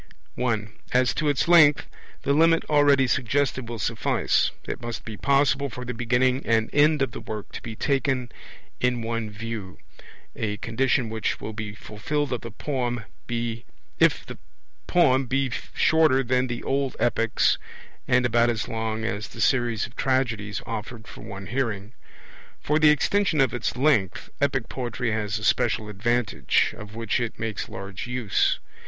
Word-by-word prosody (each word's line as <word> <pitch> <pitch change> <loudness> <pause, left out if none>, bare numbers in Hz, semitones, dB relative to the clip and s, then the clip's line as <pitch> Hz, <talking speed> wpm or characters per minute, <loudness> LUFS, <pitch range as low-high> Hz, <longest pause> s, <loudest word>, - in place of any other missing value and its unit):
(1) 110 -4 -2 0.2
As 125 0 +3
to 150 -1 0
its 145 +1 +1
length, 155 -4 +6 0.4
the 140 - +2
limit 165 +2 +4
already 145 -2 +5
suggested 130 0 0
will 120 - -4
suffice: 110 - +1 0.2
it - - -4
must 120 -1 -5
be 110 - -6
possible 140 +2 +2
for 125 +1 -7
the 125 - -4
beginning 125 +3 +1
and 115 -1 +1
end 150 0 +4
of 130 - -2
the - - -7
work 105 -2 -7
to - - -7
be 115 -1 -7
taken 130 -2 0 0.5
in 125 0 +2
in 120 - -4
one 115 -1 -2
view 105 -3 -6 0.6
a 105 -2 -2
condition 125 +2 0
which 110 -1 -2
will 110 - -6
be 105 -1 -6
fulfilled 135 +8 -3
if 120 - -3
the 120 -1 -3 0.5
poem 135 -7 +3
be 135 -2 +1 0.2
shorter 155 -4 +4
than 130 +1 +1
the 120 -1 -5
old 135 -1 -1
epics, 115 -1 +2 0.5
and 125 -1 +3
about 120 0 +3
as 115 -2 -2
long 110 -1 -3
as 110 0 -3
the - - -12
series 120 -4 +2
of 120 - -13
tragedies 120 -6 -1
offered 110 0 -6
for - - -11
one 100 -1 -8
hearing. 110 -2 -3 0.7
For 150 +1 +1
the 155 -1 +6
extension 160 +3 +2
of 130 -4 +3
its 120 -1 -2
length 125 -9 +1
epic 135 -4 +1
poetry 125 -1 -3
has 110 -1 -1
a 110 - -7
special 110 -1 +1
advantage, 105 - +1
of 105 0 -10
which 115 0 -1
it 120 -2 -3
makes 110 -2 -4
large 95 +3 -7
use. 125 -7 +1
120 Hz, 160 wpm, -25 LUFS, 110-135 Hz, 0.7 s, length